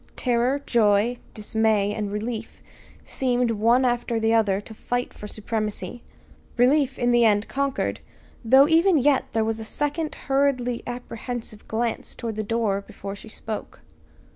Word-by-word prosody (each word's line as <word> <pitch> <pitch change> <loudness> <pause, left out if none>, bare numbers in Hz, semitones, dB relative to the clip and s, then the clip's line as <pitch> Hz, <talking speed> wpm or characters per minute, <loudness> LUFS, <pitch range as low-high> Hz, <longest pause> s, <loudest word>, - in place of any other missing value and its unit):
Terror, 250 +2 +1
joy, 220 +1 +3 0.2
dismay, 215 -1 +1
and 210 -1 -3
relief 220 +2 -4 0.4
seemed, 250 -2 0
one 230 +4 +3
after 240 -1 0
the 225 0 +2
other 210 -4 +3
to 215 +2 -10
fight 245 +3 -3
for 210 - -9
supremacy. 215 +2 -4 0.6
Relief 270 +2 +3
in 245 -1 +2
the 240 0 +5
end 210 -1 +3
conquered, 280 0 -1 0.4
though 265 +5 +6
even 335 +2 +4
yet 280 0 +3
there 225 -1 +2
was 225 0 -1
a - - -5
second 295 +6 -2
hurriedly 270 -3 +1
apprehensive 240 -2 -6
glance 230 +1 -2
toward 230 -1 -4
the 215 - -3
door 215 -2 0
before 200 -1 -8
she 220 - -11
spoke. 215 0 -7
230 Hz, 145 wpm, -24 LUFS, 215-250 Hz, 0.6 s, though